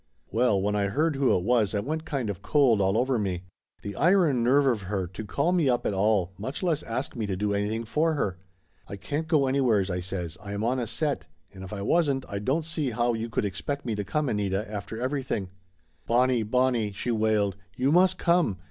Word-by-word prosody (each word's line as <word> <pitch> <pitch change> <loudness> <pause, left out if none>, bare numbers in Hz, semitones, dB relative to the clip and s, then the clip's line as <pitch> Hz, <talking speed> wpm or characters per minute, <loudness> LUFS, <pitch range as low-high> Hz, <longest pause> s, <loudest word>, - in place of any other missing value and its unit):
Well, 110 -2 +2
when 105 +2 0
I 100 -1 +1
heard 150 +8 +1
who 135 -1 +2
it 90 - -3
was 110 -2 +2
I - - +1
went 155 +9 -3
kind 135 -9 -2
of 90 - -9
cold 130 -8 +3
all 95 +2 +2
over 125 0 +1
me. 95 -3 -2 0.4
The 100 - -5
iron 165 -7 +3
nerve 140 +4 +4
of 120 -6 +2
her, 95 -3 -1
to 95 +5 -8
call 140 - 0
me 170 -6 +2
up 120 -1 +1
at - - 0
all, 95 -2 +1
much 130 - -5
less 165 -4 +1
ask 120 +4 -3
me 110 -3 -2
to 95 - -2
do 100 +2 -1
anything 105 +3 -1
for 155 +7 +1
her! 95 -10 -2 0.5
"I 100 - -6
can't 145 +10 -4
go 155 -4 +3
anywheres," 120 -8 +2
I 90 - -1
says. 90 -2 -5
"I 100 0 -6
am 100 +1 -3
on 125 +3 +1
a 120 - -2
set. 145 - -1 0.3
And 95 -1 -10
if 95 - -9
I 100 -2 -4
wasn't 140 0 +1
I 100 - -4
don't 140 +10 0
see 155 -4 -2
how 120 +1 +1
you 115 +1 -3
could 110 - -1
expect 140 +9 -4
me 115 - -1
to 105 -1 -2
come, 145 +10 -1
Anita, 105 -2 -1
after 105 +1 -6
everything!" 130 -7 -2 0.6
"Bonnie, 125 0 +3
Bonnie!" 115 -1 +1
she 120 +5 -3
wailed. 110 -3 +1 0.2
"You 130 +3 +1
must 180 +3 +4
come! 170 - +2
115 Hz, 225 wpm, -27 LUFS, 100-140 Hz, 0.6 s, nerve